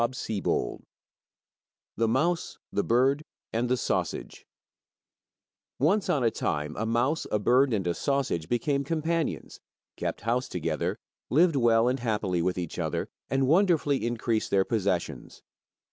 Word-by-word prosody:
23 115 -5 -1 1.2
The 115 - +1
Mouse, 170 +9 0 0.2
the 100 - +1
Bird, 135 +5 +2 0.3
and 120 +2 0
the 125 - +2
Sausage - - -3 1.3
Once 190 +9 +2
on 140 - +2
a 115 - +3
time 75 -4 -2
a 110 - -2
mouse, 120 +7 +1
a - - +3
bird, 125 +6 +3
and 100 -5 0
a 85 - +1
sausage 130 - -1
became 140 +4 +1
companions, 165 +2 -2 0.4
kept - - -3
house 120 +4 0
together, - - -2 0.3
lived 165 +3 +4
well 115 -2 +4
and 130 +2 +1
happily 105 -7 0
with 90 +2 0
each 85 -3 -4
other, - - -2 0.2
and 135 0 +2
wonderfully 160 - +3
increased 115 -1 -1
their 95 -1 +3
possessions. 100 -6 -2
120 Hz, 135 wpm, -28 LUFS, 105-140 Hz, 1.3 s, lived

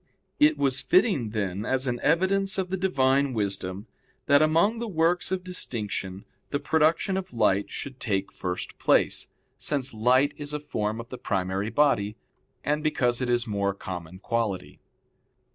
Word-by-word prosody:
It 300 +1 +5
was 135 -2 +3
fitting, 205 - +2
then, 100 -2 -2
as 130 +2 0
an 120 -2 -1
evidence 190 +5 +2
of 185 -1 -2
the - - +1
Divine 140 -7 +2
wisdom, 100 -1 -2 0.4
that 145 +1 +5
among 165 +9 +3
the 235 - -3
works 175 -1 +1
of 185 -1 -1
distinction 105 - -4 0.2
the 145 - -1
production 160 +6 +2
of 190 -1 -5
light 100 -3 +2
should 135 -2 -6
take 100 -3 -1
first 90 -1 -5
place, - - +2 0.3
since 140 -3 -1
light 125 +5 +3
is 145 0 -5
a 150 - -2
form 110 -7 -3
of 115 +1 -8
the 125 - -8
primary 95 +1 -1
body, 110 -5 +2 0.5
and 150 +1 0
because 125 -5 +1
it 125 - -1
is 120 0 +2
more 100 -3 -1
common 90 -2 -7
quality. 105 -3 -3
130 Hz, 160 wpm, -26 LUFS, 105-160 Hz, 0.5 s, It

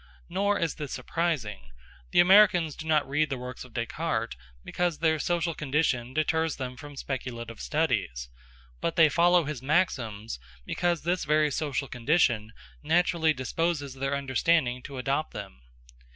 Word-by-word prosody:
Nor 200 +3 +1
is 165 -2 0
this 150 -3 -6
surprising. 125 - -2 0.4
The - - +3
Americans 180 -4 +5
do 160 - -8
not 155 -3 +2
read 145 +2 +1
the 135 - -2
works 125 0 -7
of - - -14
Descartes, - - -2 0.3
because 175 -3 -1
their 160 -1 +2
social 170 +2 0
condition 135 -4 -1
deters 160 +1 +1
them 130 -2 -5
from 145 +1 -10
speculative 120 -4 -5
studies; - - -1 0.5
but 165 - -1
they 160 -2 +6
follow 175 +2 +4
his 145 -4 -5
maxims 120 - -1 0.3
because 175 -2 0
this 175 +2 0
very 150 0 +2
social 145 -1 -2
condition 120 -4 +1 0.3
naturally 165 0 +2
disposes 145 +1 -2
their 135 +1 -2
understanding 135 -1 +1
to 135 +1 -8
adopt 135 +4 -1
them. 60 0 -8
150 Hz, 145 wpm, -28 LUFS, 125-165 Hz, 0.5 s, they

